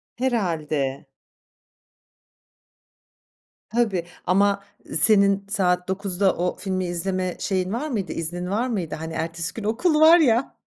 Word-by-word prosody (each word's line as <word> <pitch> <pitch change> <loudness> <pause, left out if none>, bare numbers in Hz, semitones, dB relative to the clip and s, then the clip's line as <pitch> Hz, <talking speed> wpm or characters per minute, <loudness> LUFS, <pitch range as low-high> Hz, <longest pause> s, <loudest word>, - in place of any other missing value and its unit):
Herhâlde. 155 - -1 2.6
Tabii, 210 -6 0 0.2
ama 200 +2 +2 0.4
senin, 200 -2 +4
saat 180 -3 +1
21.00´da 190 0 0
o 180 +1 -2
filmi, 185 -2 -2
izleme 185 +1 -2
şeyin 190 0 -1
var 295 +6 -2
mıydı, 210 -9 -3
iznin 175 +2 -4
var 220 +6 0
mıydı? 180 -11 -3
Hani, 160 +1 -6
ertesi 165 +1 -3
gün 225 - -7
okul 300 - +1
var 320 +2 +8
ya. 250 -4 +2
190 Hz, 120 wpm, -23 LUFS, 175-220 Hz, 2.6 s, var